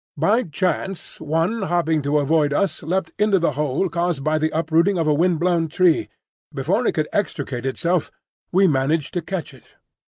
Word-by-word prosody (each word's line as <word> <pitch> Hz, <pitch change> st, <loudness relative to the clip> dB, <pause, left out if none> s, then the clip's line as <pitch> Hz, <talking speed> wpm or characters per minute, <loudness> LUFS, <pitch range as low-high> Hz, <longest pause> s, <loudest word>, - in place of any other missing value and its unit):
By 205 Hz, -, +3 dB
chance, 185 Hz, -, -3 dB
one 165 Hz, +9 st, 0 dB
hopping 170 Hz, -4 st, +1 dB
to 145 Hz, +1 st, +1 dB
avoid 145 Hz, 0 st, +2 dB
us 195 Hz, +4 st, 0 dB
leapt 180 Hz, +5 st, -2 dB
into 210 Hz, -2 st, +3 dB
the 170 Hz, -4 st, +1 dB
hole 150 Hz, +5 st, -1 dB
caused 170 Hz, -4 st, -2 dB
by 155 Hz, +1 st, +1 dB
the 155 Hz, 0 st, +1 dB
uprooting 165 Hz, +4 st, +1 dB
of 165 Hz, -2 st, 0 dB
a 150 Hz, -, +4 dB
wind 170 Hz, +2 st, +2 dB
blown 170 Hz, -1 st, +1 dB
tree; 170 Hz, +1 st, +2 dB, 0.4 s
before 185 Hz, -, 0 dB
it -, -, +1 dB
could 155 Hz, -1 st, -1 dB
extricate 135 Hz, -9 st, -2 dB
itself 170 Hz, +5 st, 0 dB, 0.4 s
we 190 Hz, +2 st, +4 dB
managed 145 Hz, +1 st, 0 dB
to 175 Hz, -, -1 dB
catch 170 Hz, -3 st, -5 dB
it. 130 Hz, -, -20 dB
165 Hz, 180 wpm, -21 LUFS, 150-185 Hz, 0.4 s, a